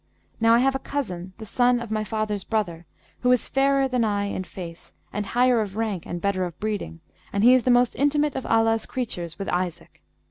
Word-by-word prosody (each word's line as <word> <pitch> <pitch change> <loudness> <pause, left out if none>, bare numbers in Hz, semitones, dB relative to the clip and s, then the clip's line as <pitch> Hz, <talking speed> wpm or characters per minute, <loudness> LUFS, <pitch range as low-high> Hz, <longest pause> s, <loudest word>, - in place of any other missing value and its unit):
Now 230 0 +5
I - - +5
have 270 +2 +3
a 270 - -2
cousin, 185 -12 -4
the 220 - -8
son 245 +3 +2
of 235 -2 -7
my 215 0 0
father's 215 -2 -2
brother, 175 -7 -2 0.3
who 250 - +2
is 250 - +3
fairer 275 0 +2
than 250 -2 0
I 205 -2 0
in 200 -2 -3
face 170 -2 -9 0.2
and 205 0 -3
higher 245 0 +3
of 200 -2 -4
rank 215 -6 -2
and 175 - -4
better 195 0 0
of 175 -3 -6
breeding; 205 -6 -4 0.3
and 200 +1 0
he 245 +2 +8
is 255 -3 +3
the - - +2
most 245 0 +4
intimate 290 +1 +1
of 265 - -4
Allah's 225 0 +2
creatures 175 -10 -4
with 195 - -5
Isaac.' 180 - -3
220 Hz, 215 wpm, -24 LUFS, 195-250 Hz, 0.3 s, he